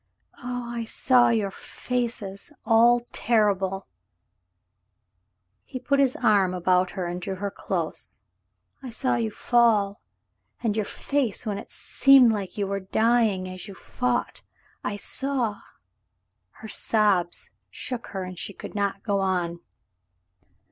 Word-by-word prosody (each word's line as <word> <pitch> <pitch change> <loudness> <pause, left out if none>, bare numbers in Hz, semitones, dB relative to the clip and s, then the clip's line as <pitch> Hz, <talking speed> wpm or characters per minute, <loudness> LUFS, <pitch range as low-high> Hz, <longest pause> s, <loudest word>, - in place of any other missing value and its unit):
"Oh, 245 -1 -4
I 235 -1 -3
saw 245 +2 +3
your 215 -4 +1
faces 235 -2 -4
— - - -45
all 235 +2 +5
terrible 195 -4 +1 0.6
— 90 +1 -52 0.2
" 90 0 -50
He - - -7
put 280 +2 +1
his 270 -2 +3
arm 200 -6 +3
about 180 0 +2
her 185 - -1
and 175 +1 -4
drew 190 +1 -4
her 200 +1 -4
close. 170 - -3 0.6
*'I 260 - -7
saw 255 +3 -1
you 230 -2 -1
fall, 215 -3 +2 0.6
and 215 -3 +1
your 215 -2 0
face 275 -6 -1
when 205 -2 -2
it - - -11
seemed 270 -4 +5
like 200 -3 -4
you 205 - 0
were 195 0 -2
dying 220 -1 +1
as 185 +1 -8
you 200 - -9
fought. 245 +3 -2 0.4
I 205 - -2
saw 250 -1 -1 0.3
— - - -51
" - - -52
Her 220 - -7
sobs 200 -5 +1 0.2
shook 250 -2 -5
her, 190 -2 -5
and 185 -1 -7
she 200 - -4
could - - -9
not 200 -1 -2
go 200 -3 0
on. 180 -3 -1
205 Hz, 150 wpm, -25 LUFS, 185-235 Hz, 0.6 s, all